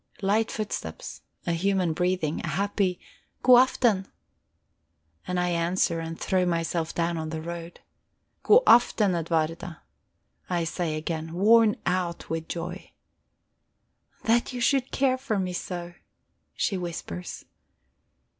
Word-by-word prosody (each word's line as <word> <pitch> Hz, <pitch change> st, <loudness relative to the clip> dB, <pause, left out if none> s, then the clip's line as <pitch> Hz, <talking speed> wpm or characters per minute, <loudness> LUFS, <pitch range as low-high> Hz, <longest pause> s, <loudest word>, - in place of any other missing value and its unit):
Light 215 Hz, +3 st, +2 dB
footsteps, 205 Hz, -, -5 dB, 0.2 s
a -, -, 0 dB
human 180 Hz, 0 st, +1 dB
breathing, 180 Hz, -2 st, 0 dB
a -, -, -3 dB
happy 190 Hz, +2 st, 0 dB, 0.4 s
"Godaften." 245 Hz, -5 st, +5 dB, 1.2 s
And 180 Hz, 0 st, -1 dB
I 180 Hz, 0 st, +1 dB
answer, 170 Hz, 0 st, +1 dB
and 165 Hz, 0 st, -6 dB
throw 185 Hz, -1 st, +1 dB
myself 165 Hz, -1 st, -1 dB
down 170 Hz, -1 st, 0 dB
on 160 Hz, 0 st, -4 dB
the 160 Hz, 0 st, -4 dB
road. 170 Hz, +1 st, -7 dB, 0.6 s
"Godaften, 240 Hz, -, +5 dB
Edwarda," 165 Hz, 0 st, -2 dB, 0.7 s
I 175 Hz, -2 st, 0 dB
say 165 Hz, -1 st, -2 dB
again, 160 Hz, +1 st, -4 dB
worn 215 Hz, +4 st, +5 dB
out 180 Hz, -2 st, -2 dB
with 165 Hz, 0 st, -3 dB
joy. 175 Hz, +2 st, -6 dB, 1.3 s
"That 235 Hz, +3 st, +2 dB
you 250 Hz, -, -4 dB
should 265 Hz, +1 st, +2 dB
care 260 Hz, -1 st, +1 dB
for 255 Hz, -6 st, -2 dB
me 185 Hz, -2 st, -2 dB
so!" 175 Hz, -1 st, -5 dB, 0.6 s
she 195 Hz, -, 0 dB
whispers. 165 Hz, -, -6 dB
180 Hz, 115 wpm, -26 LUFS, 165-205 Hz, 1.3 s, Godaften